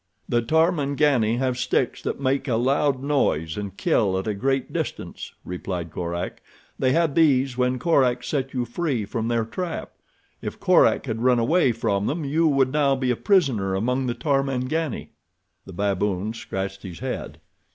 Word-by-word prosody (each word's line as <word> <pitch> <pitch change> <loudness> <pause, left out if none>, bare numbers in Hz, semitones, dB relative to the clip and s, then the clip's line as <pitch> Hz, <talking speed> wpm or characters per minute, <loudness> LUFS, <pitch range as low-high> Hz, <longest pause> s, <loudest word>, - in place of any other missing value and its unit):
"The 120 - +2
Tarmangani 145 -5 +2
have 130 -1 -1
sticks 125 0 0
that - - -3
make 135 +1 0
a 120 - +1
loud 135 +2 +1
noise 80 - +1
and 100 -2 -6
kill 95 -4 +2
at 95 - -3
a 110 - -1
great 135 +5 -1
distance," - - -5
replied 90 -2 -4
Korak. 85 +1 -4 0.4
"They 130 - +2
had 165 0 +2
these 135 -5 +3
when 125 0 +1
Korak 125 -5 +2
set 135 -3 -2
you 125 -2 -1
free 125 -4 -2
from 115 +2 -3
their 115 -1 +1
trap. 170 +9 -5 0.5
If - - -6
Korak - - +4
had 110 0 -3
run 125 0 +4
away 130 +4 +3
from 100 -3 -1
them 155 +1 -2
you 160 +4 +2
would 135 -3 +2
now 140 -2 +3
be 130 -1 0
a - - +1
prisoner 125 - +2
among 125 +6 0
the 120 - -1
Tarmangani." 135 +1 -1 0.6
The 95 - -9
baboon 100 +1 -1
scratched 95 -3 -5
his 90 -3 -8
head. - - -5
125 Hz, 165 wpm, -24 LUFS, 105-140 Hz, 0.6 s, Korak